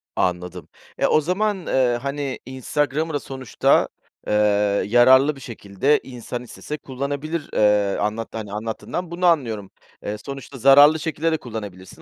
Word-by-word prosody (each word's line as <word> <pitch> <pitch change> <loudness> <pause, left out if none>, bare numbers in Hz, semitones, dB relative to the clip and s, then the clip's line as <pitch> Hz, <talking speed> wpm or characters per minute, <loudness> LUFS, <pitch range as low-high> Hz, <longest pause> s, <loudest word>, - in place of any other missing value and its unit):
Anladım. 90 -2 -2 0.3
E, - - +2
o 155 - +3
zaman, 205 +6 0
ııı, 125 -2 +2
hani, 140 +1 -4
Instagram'ı 145 +4 -2
da 145 - 0
sonuçta, 130 -3 +1 0.4
ııı, 105 -1 +2
yararlı 130 +6 +5
bir 135 - -13
şekilde 115 +4 0
insan 120 -1 -7
istese 150 +4 -7
kullanabilir. 140 +4 -4
Eee, 105 -2 +3
anlat 110 +2 -2
hani, 105 -3 -6
anlattığından 115 +11 -5
bunu 180 +1 -2
anlıyorum. 115 - +1 0.3
Eee, 105 - -4
sonuçta 135 +3 -9
zararlı 145 +5 +7
şekilde 160 +1 -1
de 160 - +1
kullanabilirsin, 105 -7 -9
130 Hz, 140 wpm, -22 LUFS, 105-145 Hz, 0.4 s, zararlı